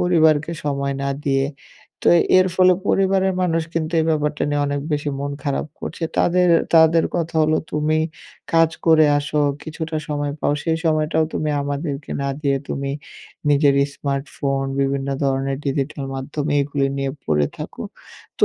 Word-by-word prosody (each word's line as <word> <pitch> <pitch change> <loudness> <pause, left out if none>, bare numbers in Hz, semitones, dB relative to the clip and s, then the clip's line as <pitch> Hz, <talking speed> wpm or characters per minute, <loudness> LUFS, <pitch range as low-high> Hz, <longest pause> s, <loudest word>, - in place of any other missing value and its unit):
পরিবারকে 160 -3 +3
সময় 140 -1 -1
না 140 - -1 0.2
দিয়ে। 135 -1 +2 0.6
তো - - +5 0.3
এর 185 - +4
ফলে 185 0 +5 0.2
পরিবারের 190 0 +2
মানুষ 165 -2 +1
কিন্তু 160 0 -1
এই - - +1
ব্যাপারটা 150 -1 0
নিয়ে 145 0 +1
অনেক 145 0 -1
বেশি 145 0 -1
মন 145 0 -3
খারাপ 140 +1 -1
করছে। 165 - -6 0.2
তাদের, 180 +1 +3 0.3
তাদের, 160 0 +6
কথা 165 -1 -2
হলো 155 0 +3 0.2
তুমি 150 +1 +1 0.6
কাজ 165 -1 +5 0.2
করে 155 -1 +6
আসো, 150 +1 -1 0.2
কিছুটা 160 0 -5
সময় 145 -1 -2
পাও, - - +1
সেই 160 -1 +1
সময়টাও 155 0 +2
তুমি 155 - -1
আমাদেরকে 140 0 -4
না 140 - -1
দিয়ে 140 -2 +1
তুমি 140 0 -3 0.6
নিজের 140 -1 +4
ইস্মার্টফোন, 140 -1 -3 0.2
বিভিন্ন 135 0 0 0.2
ধরনের 135 0 0
ডিজিটাল 140 +1 -2
মাধ্যম 140 +2 -4
এইগুলি 140 -1 0
নিয়ে 135 0 -1
পড়ে 75 -2 +2
থাকো, - - -7 0.6
তো - - +7
150 Hz, 155 wpm, -21 LUFS, 140-160 Hz, 0.6 s, তো